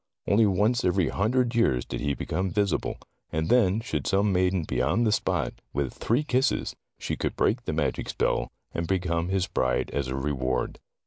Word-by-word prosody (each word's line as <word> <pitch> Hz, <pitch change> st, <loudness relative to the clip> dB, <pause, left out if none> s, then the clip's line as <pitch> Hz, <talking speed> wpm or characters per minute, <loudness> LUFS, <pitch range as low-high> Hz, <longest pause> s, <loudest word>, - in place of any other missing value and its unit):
Only 105 Hz, +2 st, +4 dB
once 105 Hz, +6 st, +2 dB
every 90 Hz, -2 st, +2 dB
hundred 120 Hz, +4 st, +1 dB
years 90 Hz, -, +2 dB
did -, -, -5 dB
he 70 Hz, -1 st, 0 dB
become 95 Hz, +1 st, -2 dB
visible, 100 Hz, -3 st, 0 dB, 0.3 s
and 80 Hz, +1 st, -1 dB
then 110 Hz, -4 st, +4 dB
should 75 Hz, -, -3 dB
some 100 Hz, +1 st, +2 dB
maiden 90 Hz, -1 st, +2 dB
be 65 Hz, -4 st, -1 dB
on 90 Hz, -, +2 dB
the 110 Hz, -, +3 dB
spot 90 Hz, -, 0 dB, 0.2 s
with 70 Hz, -2 st, -1 dB
three 120 Hz, +7 st, 0 dB
kisses 130 Hz, -1 st, 0 dB, 0.2 s
she -, -, -3 dB
could -, -, -2 dB
break 120 Hz, +2 st, +1 dB
the -, -, -1 dB
magic 75 Hz, -1 st, -1 dB
spell, -, -, 0 dB, 0.2 s
and 85 Hz, 0 st, -2 dB
become 85 Hz, -2 st, 0 dB
his 95 Hz, -1 st, +1 dB
bride 65 Hz, -7 st, 0 dB
as 70 Hz, -2 st, -1 dB
a 65 Hz, -, -3 dB
reward. 65 Hz, -2 st, -1 dB
95 Hz, 185 wpm, -27 LUFS, 75-110 Hz, 0.3 s, Only